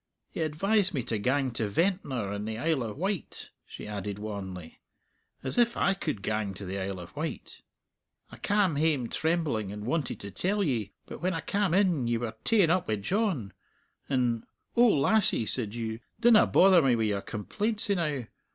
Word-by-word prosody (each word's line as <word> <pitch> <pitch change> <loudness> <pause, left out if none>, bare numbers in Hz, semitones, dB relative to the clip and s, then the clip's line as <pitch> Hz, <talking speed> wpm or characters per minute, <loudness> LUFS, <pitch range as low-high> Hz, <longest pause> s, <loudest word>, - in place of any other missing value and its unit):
He - - -4
advised 190 +5 +1
me 130 - -1
to 115 -3 -2
gang 130 +3 +1
to 115 -2 -2
Ventnor 130 - 0
in 105 0 -4
the 110 0 -4
Isle 155 +2 +1
o' 115 -3 -3
Wight," 190 +1 -4 0.2
she - - -9
added 100 -1 -4
wanly; 95 -5 -7 0.6
"as 130 - 0
if 235 0 +3
I 195 - +3
could 105 - -4
gang 105 -3 -1
to 100 - -7
the 95 +2 -4
Isle 95 -1 -4
of 90 - -11
Wight. - - -5 0.7
I - - -10
cam 200 -7 +1
hame 145 -6 +1
trembling, 155 - 0
and 105 0 -7
wanted 145 +1 -1
to 100 - -7
tell 200 - 0
ye; 115 - -1
but - - -9
when 185 +1 0
I 165 - -2
cam 195 +1 0
in 175 -11 +2
ye 120 0 +1
were 115 -1 -4
ta'en 200 -8 +4
up 185 0 +1
wi' 110 - +1
John, 135 - -1 0.6
and, 125 -4 0 0.3
'O 240 +1 +6
lassie,' 200 - +3
said 110 -1 -2
you, 110 -1 -4 0.2
'dinna 230 -2 +6
bother 185 -2 +6
me 130 -4 +3
wi' 115 - 0
your 100 -2 0
complaints 210 - -2
enow.' 150 - 0
130 Hz, 185 wpm, -29 LUFS, -, 0.7 s, O